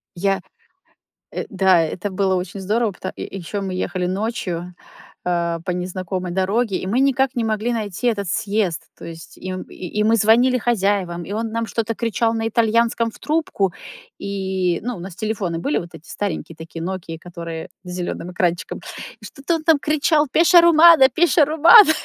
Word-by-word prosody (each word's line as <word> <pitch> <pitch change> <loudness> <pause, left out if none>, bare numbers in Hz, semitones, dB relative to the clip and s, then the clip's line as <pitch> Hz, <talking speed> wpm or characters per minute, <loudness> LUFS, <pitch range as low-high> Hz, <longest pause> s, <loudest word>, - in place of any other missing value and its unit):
Я 195 +2 0 0.9
э, - - -3
да, 190 -3 +4
это 180 +5 -3
было 190 0 +1
очень 185 +2 -4
здорово. 215 +3 0
Пото 185 +1 -6
ещё 195 +2 -5
мы 190 -1 -4
ехали 180 -1 -3
ночью, 180 -3 -3 0.5
э, 170 -1 -1
по - - -2
незнакомой 185 0 -4
дороге, 195 +3 0
и - - -6
мы 225 +7 +1
никак 270 -1 +2
не 235 - 0
могли 220 +2 -1
найти 215 0 -3
этот 200 -5 -1
съезд. 195 -3 -1 0.2
То - - -11
есть 165 -1 -10
и 185 - -7
м 185 0 -4
и 185 +4 -4
мы 225 +1 +4
звонили 235 +4 +4
хозяевам, 195 -7 0
и 200 - -7
он 225 +2 -2
нам 230 0 -1
что-то 230 0 -2
кричал 230 0 0
на 225 0 -1
итальянском 230 +1 +1
в - - -16
трубку. 300 - -1 0.5
И, 190 -3 -1
ну, 245 +1 -3
у - - -9
нас 180 0 -8
телефоны 205 -6 -2
были, 150 -3 0
вот 170 0 -8
эти 155 - -13
старенькие 170 -4 -4
такие 165 0 -8
"Нокии", 170 -2 -5
которые 170 -1 -7 0.2
с 180 - -8
зелёным 175 0 -4
экранчиком. 175 -1 -1 0.5
И - - -8
что-то 280 +4 -3
он 320 - -6
там 325 -2 +5
кричал: 305 +1 +2
"Пеша-Романа, 335 -3 +7
Пеша-Романа". 320 - +6
200 Hz, 170 wpm, -21 LUFS, 180-235 Hz, 0.9 s, Пеша-Романа